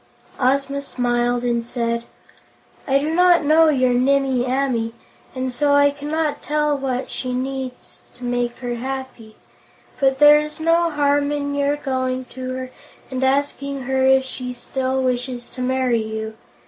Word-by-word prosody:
Ozma 275 +2 +1
smiled 245 -2 0
as 240 -1 +1
she - - -1
said: 235 0 -2 0.8
"I 275 0 +4
do 300 +3 -1
not 355 -1 +5
know 315 +2 +5
your 255 -4 +2
Nimmie 265 0 +2
Amee, 250 -3 0 0.4
and 255 -1 -2
so 285 +3 +2
I 285 0 +5
cannot 295 +2 -2
tell 300 0 0
what 265 -2 -3
she 255 - -4
most 250 +1 0
needs 265 -2 -7
to 250 - -13
make 245 0 -1
her 240 -1 -3
happy. 260 -3 -6 0.6
But 270 -1 +3
there 295 +1 +8
is 300 0 -5
no 335 +1 +3
harm 290 -1 +1
in 285 -1 -2
your 285 0 +1
going 260 -2 -2
to 255 0 -5
her 255 0 -6 0.4
and 260 0 -2
asking 280 0 0
her 265 +1 0
if 265 0 +4
she 255 -1 -6
still 260 +2 -2
wishes 250 -1 -2
to 255 - -7
marry 255 -2 +1
you. 220 0 -5
265 Hz, 160 wpm, -21 LUFS, 250-285 Hz, 0.8 s, there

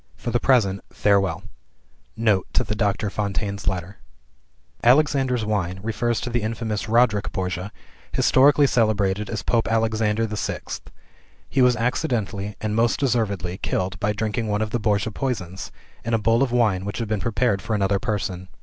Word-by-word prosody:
For 120 - -5
the 120 - +2
present 105 -8 +2
farewell." 100 -2 +1 0.7
Note 110 -5 +2
to - - +2
Doctor 105 -2 -1
Fontaine's 100 -2 -3
Letter 95 +2 -2 0.9
"Alexander's 130 -2 +3
Wine" 95 -4 -1
refers 115 +1 -1
to 125 - -4
the 120 0 0
infamous 110 0 -3
Roderic 115 -3 +3
Borgia, 90 +1 -3 0.4
historically 140 +2 +5
celebrated 105 -5 +1
as 105 -4 -3
Pope 115 +1 +1
Alexander 110 -1 +1
the 110 -1 -4
Sixth. - - -5 0.6
He 130 - +1
was 125 -1 +5
accidentally, 110 -5 -2
and 110 0 -2
most 115 +1 +2
deservedly, 100 -9 -1
killed 95 0 -2
by 105 +2 +1
drinking 110 +2 -2
one 105 0 0
of 110 - -5
the 120 - 0
Borgia 105 0 0
poisons, 100 -8 -4 0.3
in 115 0 0
a - - +3
bowl 115 +3 +2
of 135 -3 +1
wine 110 -6 +2
which 100 +1 -4
he 115 - -2
had 105 -2 -1
prepared 115 -3 +1
for 110 - -2
another 100 -1 +1
person. 95 -4 -3
110 Hz, 160 wpm, -23 LUFS, 100-115 Hz, 0.9 s, historically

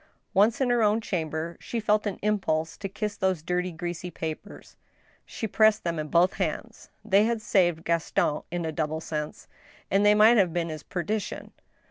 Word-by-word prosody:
Once 210 +3 +3
in 260 -3 +2
her 240 -1 +3
own 215 +1 +3
chamber, 165 -5 -3
she 235 - -4
felt 215 -1 +1
an 200 - -3
impulse 165 -7 0
to 195 - -6
kiss 205 +1 -4
those 190 -5 -1
dirty, 180 +1 -1
greasy 175 +1 -5
papers. 160 -2 -7 0.5
She - - -5
pressed 215 +1 +3
them 170 -2 -2
in 155 - -3
both 175 +4 +3
her 195 - +1
hands. 220 +8 -5 0.2
They 200 +2 +4
had 230 0 0
saved 175 -6 +1
Gaston 165 -2 0
in 175 0 -3
a 160 - -2
double 155 0 -2
sense 150 -2 -5 0.2
— - - -27
and 195 +1 +3
they 205 0 +6
might 220 +3 +6
have 185 -5 +3
been 170 -1 -1
his 155 -1 -6
perdition. 205 +3 -4
180 Hz, 190 wpm, -27 LUFS, 165-210 Hz, 0.5 s, they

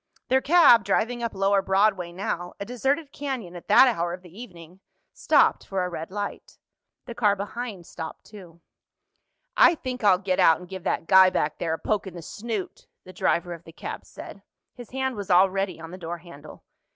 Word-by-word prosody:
Their 265 +1 +3
cab, 290 -9 +6
driving 230 +5 0
up 230 -3 -3
lower 195 +1 +2
Broadway 190 -2 +1
now—a 175 +1 -5
deserted 270 +6 -2
canyon 260 -12 -5
at 175 - -11
that 265 - +7
hour 175 -8 -1
of 180 +1 -9
the 175 0 -16
evening—stopped 185 -5 -1
for 190 -2 -1
a - - -4
red 165 -2 -6
light. 205 +1 -6 0.5
The 235 - -7
car 210 -4 +2
behind 205 -1 -6
stopped 160 -1 -8
too. 175 -5 -14 0.9
"I - - +6
think 255 -5 -6
I'll 195 -3 +5
get 185 -1 -2
out 160 - +6
and 180 - -12
give 190 -1 -9
that - - -1
guy 190 +1 +7
back 150 -4 -2
there 160 -1 -1
a - - -9
poke 205 +1 -2
in 185 - -9
the 170 - -8
snoot," 215 +2 -6 0.2
the 185 - -13
driver 175 -1 0
of 170 -1 -11
the 165 - -13
cab - - -7
said. - - -11 0.3
His 245 -2 -12
hand 265 0 -2
was 200 -2 -7
already 190 0 +2
on 165 0 -9
the 185 - -9
door 170 0 -5
handle. 160 -3 -14
190 Hz, 190 wpm, -25 LUFS, 175-230 Hz, 0.9 s, that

